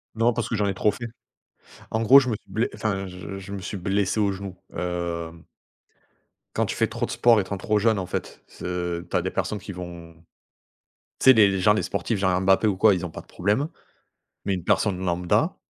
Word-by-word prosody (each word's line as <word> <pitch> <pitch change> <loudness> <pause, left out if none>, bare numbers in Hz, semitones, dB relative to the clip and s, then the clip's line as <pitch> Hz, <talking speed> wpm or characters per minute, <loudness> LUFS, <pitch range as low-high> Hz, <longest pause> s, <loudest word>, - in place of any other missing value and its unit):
Non, 115 +2 +3
parce 120 0 -2
que - - -1
j'en 105 0 +1
ai 100 - 0
trop 105 +2 +2
fait. 120 - -7 0.9
En 110 - 0
gros, 130 +5 +8
je 130 - -2
me 115 - 0
suis - - -24
ble 115 +2 0
enfin 100 -3 -2
je 90 +2 -8
je 95 +1 -9
me 100 - -4
suis 100 +1 -5
blessé 100 +3 0
au 100 -1 +2
genou. 95 -1 -7 0.2
Hem 85 -2 -4 1.1
Quand - - +2
tu - - -3
fais - - +2
trop - - -3
de - - -7
sport 120 -2 +4
étant 100 0 -3
trop 105 +3 +1
jeune 110 0 +3
en 95 - -2
fait, - - -5
c'est - - -11 0.4
tu - - -4
as 90 - +3
des 95 - -3
personnes 100 +2 -2
qui 100 +1 -8
vont 85 -2 -8 1.1
tu - - -3
sais - - +11
les 105 -3 +6
les 95 -1 -1
genre 105 +3 +5
les 105 - 0
sportifs 100 +2 -2
genre 95 -2 +2
Mbappé 95 +3 +3
ou 100 -3 +1
quoi 105 +2 +5
ils 90 -1 -3
ont - - -8
pas - - -8
de - - -28
problème 105 - 0 0.8
mais 100 - 0
une 90 -3 -5
personne 95 0 +2
lambda 90 0 +1
95 Hz, 230 wpm, -25 LUFS, 90-105 Hz, 1.1 s, sais